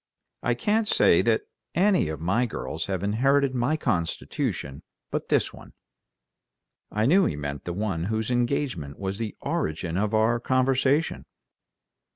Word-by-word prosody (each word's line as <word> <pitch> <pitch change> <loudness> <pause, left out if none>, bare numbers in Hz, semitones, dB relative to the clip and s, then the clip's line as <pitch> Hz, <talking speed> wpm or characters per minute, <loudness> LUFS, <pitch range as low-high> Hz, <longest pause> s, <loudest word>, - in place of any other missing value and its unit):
I - - +1
can't 220 0 +1
say - - +5
that 425 - +2 0.3
any 185 - +3
of 80 - -4
my 95 +10 +1
girls 80 -7 -4
have 95 -1 -2
inherited 135 +6 +2
my 130 +5 +1
constitution 85 - -2 0.3
but - - -2
this - - +1
one." - - -13 1.2
I 105 +1 +1
knew 185 +9 +5
he 75 - -1
meant 70 -1 -5
the 85 - -3
one 95 -4 -2
whose 110 +3 -1
engagement 120 - -1
was 95 +1 -4
the 110 -2 -4
origin 80 +2 -2
of 105 +2 0
our 115 +2 +3
conversation. 135 +4 +1
110 Hz, 145 wpm, -26 LUFS, 90-135 Hz, 1.2 s, say